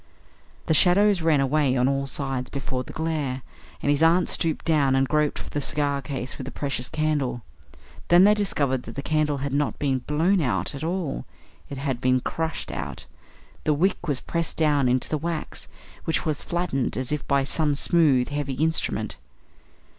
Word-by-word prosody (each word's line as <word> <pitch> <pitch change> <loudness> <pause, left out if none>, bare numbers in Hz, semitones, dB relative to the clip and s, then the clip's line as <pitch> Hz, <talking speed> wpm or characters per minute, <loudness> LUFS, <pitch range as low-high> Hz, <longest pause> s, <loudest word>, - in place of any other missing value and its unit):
The - - +2
shadows 190 +3 +5
ran 160 -3 +3
away 135 -1 +2
on 125 +1 +3
all 135 0 0
sides 135 -2 -2
before 130 -2 -4
the - - -10
glare, 150 -6 -2 0.4
and 145 - +2
his 145 +1 +1
aunt 170 +2 +4
stooped 160 -2 0
down 145 -5 +3
and 135 0 +2
groped 150 0 +1
for - - -7
the 145 - -2
cigar 140 0 +1
case 130 -1 -5
with 130 - -5
the 135 - -6
precious 135 -3 -3
candle. 145 -6 -1 0.6
Then 175 +1 +6
they 205 +2 +7
discovered 145 -11 0
that - - -10
the 140 - -4
candle 150 -2 0
had 140 - -3
not 145 +1 0
been 135 -3 0
blown 165 +8 +1
out 95 - -1
at 140 +1 -6
all; 170 -4 -3 0.4
it 140 - -6
had 135 -3 -3
been 130 0 +3
crushed 160 +5 -4
out. - - -6 0.6
The 150 - +2
wick 175 +2 0
was 140 -4 -1
pressed 170 -1 -3
down 145 -5 +3
into 125 +1 +1
the 155 - -2
wax, 165 -1 -4 0.4
which 160 - -1
was 155 -3 -1
flattened 170 -7 -2
as 130 +1 -3
if 150 -1 -3
by 140 -1 +2
some 150 +1 +2
smooth, 140 -5 +3
heavy 145 -2 -3
instrument. 160 +4 +1
145 Hz, 185 wpm, -24 LUFS, 135-160 Hz, 0.6 s, they